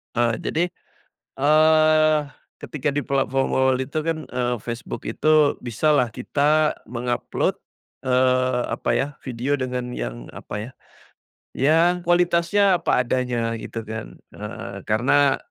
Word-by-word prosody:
Eee, 120 Hz, -1 st, +2 dB
jadi, 165 Hz, -, 0 dB, 0.8 s
eee, 155 Hz, +1 st, +5 dB, 0.4 s
ketika 150 Hz, -1 st, -3 dB
di 145 Hz, -, 0 dB
platform 135 Hz, 0 st, 0 dB
awal-awal 130 Hz, -1 st, +2 dB
itu 135 Hz, +4 st, -5 dB
kan, 165 Hz, -1 st, 0 dB
eee, 125 Hz, -1 st, -1 dB
Facebook 120 Hz, 0 st, -6 dB
itu, 155 Hz, -2 st, +3 dB
bisalah 125 Hz, 0 st, +1 dB
kita 150 Hz, +4 st, +1 dB
meng-upload, 120 Hz, +1 st, -2 dB, 0.5 s
eee, 130 Hz, -1 st, +2 dB
apa -, -, -3 dB
ya, 135 Hz, -, +1 dB, 0.2 s
video 130 Hz, +3 st, -1 dB
dengan 125 Hz, -1 st, -3 dB
yang -, -, -6 dB
apa 105 Hz, +3 st, -7 dB
ya, -, -, -16 dB, 0.8 s
ya 150 Hz, +5 st, +3 dB, 0.2 s
kualitasnya 175 Hz, +3 st, +3 dB
apa -, -, +2 dB
adanya 120 Hz, -2 st, -1 dB
gitu 115 Hz, +1 st, -6 dB
kan 110 Hz, 0 st, -7 dB, 0.2 s
heeh, -, -, -7 dB
karena, 135 Hz, +5 st, +3 dB
130 Hz, 120 wpm, -23 LUFS, 120-155 Hz, 0.8 s, eee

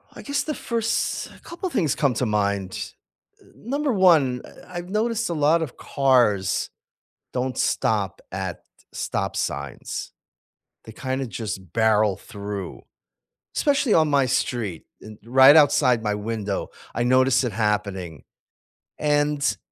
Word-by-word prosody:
I -, -, -10 dB
guess 280 Hz, 0 st, -1 dB
the 305 Hz, -, -3 dB
first 230 Hz, -1 st, -1 dB
couple 350 Hz, +2 st, -5 dB
things 170 Hz, -, +1 dB
come 140 Hz, -5 st, +1 dB
to 125 Hz, -, 0 dB
mind, 100 Hz, -3 st, -1 dB, 0.5 s
eh, -, -, -21 dB
number 275 Hz, +2 st, -2 dB
1, 160 Hz, -10 st, +4 dB
eh, -, -, -12 dB, 0.2 s
I've 175 Hz, 0 st, -7 dB
noticed 225 Hz, 0 st, 0 dB
a -, -, -1 dB
lot 155 Hz, +2 st, +3 dB
of 155 Hz, -, -5 dB
cars 120 Hz, -9 st, +2 dB, 0.6 s
don't 125 Hz, 0 st, -2 dB
stop 100 Hz, -3 st, 0 dB
at 95 Hz, -2 st, -5 dB, 0.3 s
stop -, -, -3 dB
signs, 70 Hz, -3 st, -4 dB, 0.7 s
they 110 Hz, -, -10 dB
kinda 130 Hz, +2 st, -3 dB
just 100 Hz, -6 st, -6 dB
barrel 110 Hz, -3 st, +3 dB
through- 100 Hz, -3 st, -7 dB, 0.7 s
especially 280 Hz, -5 st, +2 dB
on 155 Hz, -2 st, +4 dB
my 140 Hz, -2 st, +3 dB
street, 120 Hz, -8 st, -2 dB, 0.2 s
and 110 Hz, -1 st, -11 dB
right 130 Hz, +4 st, +7 dB
outside 130 Hz, -6 st, +4 dB
my 105 Hz, -1 st, 0 dB
window, 105 Hz, -2 st, -3 dB, 0.3 s
I 120 Hz, -, 0 dB
notice 130 Hz, +1 st, +4 dB
it 120 Hz, -, -1 dB
happening- 100 Hz, -, -2 dB, 0.7 s
and 145 Hz, -6 st, +1 dB
125 Hz, 130 wpm, -24 LUFS, 105-155 Hz, 0.7 s, right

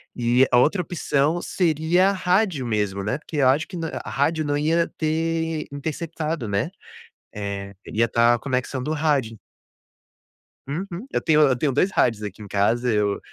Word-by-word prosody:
E 125 Hz, +2 st, +3 dB
a 125 Hz, -, +5 dB
outra 160 Hz, +9 st, +3 dB
opção 155 Hz, -1 st, 0 dB
seria 175 Hz, +2 st, +2 dB
rádio 185 Hz, -, +1 dB
mesmo, 105 Hz, -3 st, -1 dB
né, 120 Hz, +6 st, -1 dB
porque 155 Hz, 0 st, -7 dB
eu 135 Hz, -3 st, +4 dB
acho 145 Hz, +5 st, +2 dB
que 180 Hz, -, -7 dB
na 165 Hz, -1 st, -3 dB, 0.2 s
rádio 155 Hz, +3 st, 0 dB
não 145 Hz, 0 st, 0 dB
ia 165 Hz, +3 st, +2 dB
ter 160 Hz, 0 st, -1 dB
interceptado, 155 Hz, -1 st, -4 dB
né, 100 Hz, -, -1 dB, 0.6 s
eh, 100 Hz, -1 st, -5 dB
iria 115 Hz, +2 st, +1 dB
estar 115 Hz, +1 st, +3 dB
a -, -, -5 dB
conexão 130 Hz, 0 st, -2 dB
do 150 Hz, -, -3 dB
rádio. 145 Hz, -8 st, 0 dB, 1.3 s
Uhum. 175 Hz, -, -5 dB
Eu -, -, 0 dB
tenho 155 Hz, -1 st, +4 dB
eu 135 Hz, -4 st, +4 dB
tenho 140 Hz, +3 st, 0 dB
2 165 Hz, +9 st, +2 dB
rádios 110 Hz, -3 st, +1 dB
aqui 105 Hz, 0 st, -7 dB
em 105 Hz, -, -8 dB
casa. 115 Hz, +5 st, +1 dB
Eu, 105 Hz, -2 st, +1 dB
145 Hz, 165 wpm, -23 LUFS, 115-165 Hz, 1.3 s, a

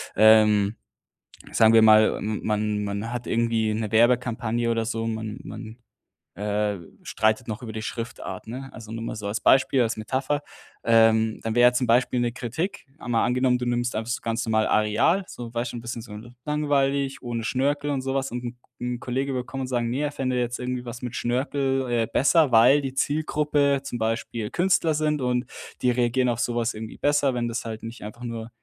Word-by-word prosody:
Ähm, 110 Hz, -1 st, +5 dB, 0.8 s
sagen 110 Hz, 0 st, +5 dB
wir 115 Hz, -, +7 dB
mal, 110 Hz, 0 st, +6 dB
ähm, 105 Hz, 0 st, -3 dB
man 105 Hz, -1 st, 0 dB
man 100 Hz, +3 st, -4 dB
hat 120 Hz, -1 st, -4 dB
irgendwie 115 Hz, -2 st, +1 dB
'ne 110 Hz, 0 st, -2 dB
Werbekampagne 120 Hz, 0 st, +2 dB
oder 115 Hz, -1 st, +1 dB
so, 115 Hz, 0 st, -2 dB
man 110 Hz, -1 st, -4 dB
man, 110 Hz, +3 st, -9 dB, 0.6 s
äh, 105 Hz, +1 st, -1 dB, 0.3 s
streitet 110 Hz, +2 st, 0 dB
noch 110 Hz, +1 st, -5 dB
über 110 Hz, -2 st, -6 dB
die 110 Hz, -, -4 dB
Schriftart, 115 Hz, -5 st, -6 dB
ne? 130 Hz, +4 st, -7 dB
Also, 110 Hz, -1 st, -10 dB
nur 115 Hz, 0 st, -5 dB
mal 115 Hz, -, -4 dB
so 105 Hz, -2 st, -5 dB
als 105 Hz, +2 st, -2 dB
Beispiel, 130 Hz, 0 st, +4 dB
als 115 Hz, -1 st, 0 dB
Metapher. 130 Hz, +6 st, -1 dB, 0.4 s
Ähm, 110 Hz, -1 st, +4 dB
dann 115 Hz, 0 st, -2 dB
wäre 120 Hz, 0 st, +6 dB
zum 125 Hz, 0 st, 0 dB
Beispiel 120 Hz, +1 st, +2 dB
'ne 120 Hz, -1 st, 0 dB
Kritik, 130 Hz, -, -4 dB
einmal 120 Hz, -2 st, 0 dB
angenommen, 125 Hz, 0 st, +2 dB
du 125 Hz, -, -4 dB
nimmst 120 Hz, 0 st, -1 dB
einfach 115 Hz, +2 st, -2 dB
ganz 115 Hz, 0 st, -2 dB
normal 110 Hz, -1 st, +2 dB
Areal, 110 Hz, -, +2 dB
so 120 Hz, -1 st, -8 dB
weißt 120 Hz, 0 st, -2 dB
du -, -, -5 dB
'n 115 Hz, -, -7 dB
bisschen 120 Hz, 0 st, -5 dB
so 110 Hz, -2 st, -11 dB, 0.3 s
langweilig, 140 Hz, -2 st, 0 dB
ohne 120 Hz, -2 st, -4 dB
Schnörkel 145 Hz, +4 st, 0 dB
und 140 Hz, -2 st, -1 dB
sowas 135 Hz, 0 st, -2 dB
und 125 Hz, -, -4 dB
'n 120 Hz, 0 st, -6 dB, 0.2 s
'n 125 Hz, 0 st, -3 dB
Kollege 135 Hz, +2 st, -2 dB
will 125 Hz, -, -1 dB
kommen 135 Hz, +2 st, -6 dB
und 130 Hz, -, -3 dB
sagen: 120 Hz, -2 st, -1 dB
„Ne, 125 Hz, +3 st, -2 dB
er 145 Hz, -, -1 dB
fände 130 Hz, -2 st, -1 dB
jetzt 120 Hz, 0 st, -2 dB
irgendwie 125 Hz, 0 st, -4 dB
was 120 Hz, 0 st, -7 dB
mit 125 Hz, -2 st, -5 dB
Schnörkel, 135 Hz, +2 st, 0 dB
äh, 115 Hz, -2 st, +1 dB
besser, 150 Hz, 0 st, +3 dB
weil 125 Hz, +6 st, +7 dB
die 135 Hz, -1 st, -4 dB
Zielgruppe 145 Hz, -1 st, +1 dB
zum 135 Hz, -3 st, -5 dB
Beispiel 115 Hz, -1 st, -2 dB
Künstler 175 Hz, -3 st, +2 dB
sind 150 Hz, 0 st, 0 dB
und 125 Hz, 0 st, 0 dB, 0.4 s
die 125 Hz, -, +3 dB
reagieren 125 Hz, +1 st, +1 dB
auf 120 Hz, -1 st, -1 dB
sowas 120 Hz, -1 st, 0 dB
irgendwie 110 Hz, 0 st, -8 dB
besser, 145 Hz, -2 st, +2 dB
wenn 120 Hz, -1 st, -1 dB
das 115 Hz, 0 st, -4 dB
halt 110 Hz, -1 st, -6 dB
nicht 115 Hz, +1 st, -8 dB
einfach 115 Hz, +3 st, -9 dB
nur 115 Hz, -1 st, -5 dB
120 Hz, 195 wpm, -25 LUFS, 110-130 Hz, 0.8 s, wir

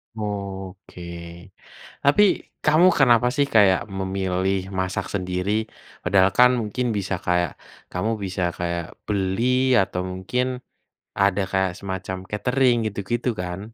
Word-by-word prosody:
Oke. 100 Hz, -3 st, -6 dB, 1.0 s
Tapi 140 Hz, +9 st, +5 dB, 0.4 s
kamu 155 Hz, +4 st, +5 dB
kenapa 120 Hz, -3 st, +5 dB
sih 140 Hz, -1 st, +3 dB
kayak 95 Hz, -4 st, +6 dB, 0.2 s
memilih 95 Hz, 0 st, -1 dB, 0.2 s
masak 95 Hz, 0 st, -2 dB
sendiri? 90 Hz, 0 st, -2 dB, 0.5 s
Padahal 95 Hz, -1 st, +4 dB
kan 125 Hz, 0 st, +8 dB
mungkin 115 Hz, +4 st, -2 dB
bisa 100 Hz, 0 st, -2 dB
kayak 90 Hz, -1 st, +2 dB, 0.4 s
kamu 100 Hz, +5 st, -1 dB
bisa 95 Hz, 0 st, -3 dB, 0.2 s
kayak 85 Hz, 0 st, -2 dB, 0.2 s
beli 95 Hz, +1 st, 0 dB, 0.4 s
atau 90 Hz, -1 st, -1 dB
mungkin 95 Hz, +7 st, -1 dB, 0.8 s
ada 100 Hz, 0 st, +3 dB
kayak 95 Hz, -1 st, +1 dB
semacam 95 Hz, -1 st, -4 dB
Katering 125 Hz, +3 st, +2 dB
gitu-gitu 110 Hz, +4 st, -2 dB
kan. 90 Hz, +1 st, -4 dB
95 Hz, 115 wpm, -23 LUFS, 95-110 Hz, 1.0 s, kan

